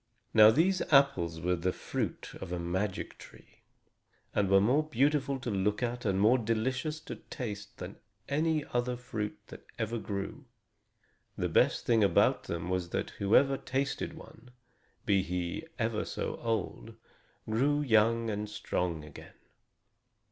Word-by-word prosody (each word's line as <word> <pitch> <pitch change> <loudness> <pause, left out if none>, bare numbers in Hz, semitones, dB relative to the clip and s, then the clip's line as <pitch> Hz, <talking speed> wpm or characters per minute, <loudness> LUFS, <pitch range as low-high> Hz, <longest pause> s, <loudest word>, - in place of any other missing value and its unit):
Now 110 -1 +9
these 180 +10 +3
apples 95 - +4
were 90 +2 +1
the 90 +2 0
fruit - - -4
of - - -6
a 90 - -1
magic 90 +3 -3
tree, - - -16 0.7
and 100 -2 +1
were 95 0 +6
more 125 +9 +3
beautiful 140 -1 +1
to 120 - -3
look 105 +3 0
at 120 0 -3
and 95 -2 +1
more 115 +6 +5
delicious 130 +7 -1
to - - -7
taste 105 -5 -7
than - - -8 0.3
any 155 +1 +1
fruit 120 -5 -3
that - - -12
ever 115 +1 -2
grew. 100 +7 -5 0.9
The - - -1
best - - +3
thing 115 -3 +4
about 100 - +3
them 85 0 -4
was 90 -1 -1
that - - -2
whoever 135 +7 +4
tasted 135 +2 -2
one, 125 - -14 0.6
be 100 -4 +3
he 90 - -3
ever 115 -3 0
so - - -4
old, 115 -4 -3 0.5
grew 140 +7 +2
young 115 -2 +3
and 105 0 -3
strong 85 -6 -2
again. 75 - -13
110 Hz, 140 wpm, -31 LUFS, 100-130 Hz, 0.9 s, Now